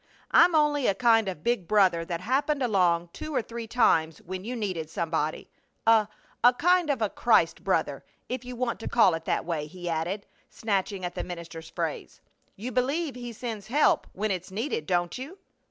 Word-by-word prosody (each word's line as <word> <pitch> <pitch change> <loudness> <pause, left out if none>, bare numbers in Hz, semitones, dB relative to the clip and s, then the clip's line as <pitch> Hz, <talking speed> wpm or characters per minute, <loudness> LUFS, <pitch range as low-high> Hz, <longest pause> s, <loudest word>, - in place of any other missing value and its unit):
I'm 345 -1 +6
only 295 -3 +3
a 195 - +2
kind 225 -1 +4
of 165 -5 -7
big 235 -8 0
brother 190 -5 +3
that 170 0 -4
happened 275 +6 0
along 175 -6 +2
two 310 +9 -6
or 245 - +1
three 230 0 -7
times 165 -10 +2
when 185 +1 -6
you 245 +4 -4
needed 185 -8 -3
somebody 160 -2 -2 0.3
a 220 -2 +5 0.4
a 245 - +7
kind 355 +2 +3
of 265 -6 +1
a 210 - +1
Christ - - +2
brother, - - 0 0.2
if 255 0 -4
you 250 0 -7
want 240 -1 -2
to - - -6
call 225 -7 +4
it 165 0 -4
that - - -1
way," 160 -3 -2
he 175 +2 -8
added, 170 +5 -2 0.2
snatching 200 -3 -2
at 175 - -4
the - - -4
minister's 170 -2 -8
phrase. - - -4 0.4
"You 235 +6 -6
believe 275 +5 0
He 245 -1 -7
sends 220 -3 -6
help 300 - +3
when 210 +2 -1
it's 185 -1 -4
needed, 195 - -3
don't 175 -1 0
you?" 295 +9 -8
215 Hz, 190 wpm, -27 LUFS, 175-250 Hz, 0.4 s, a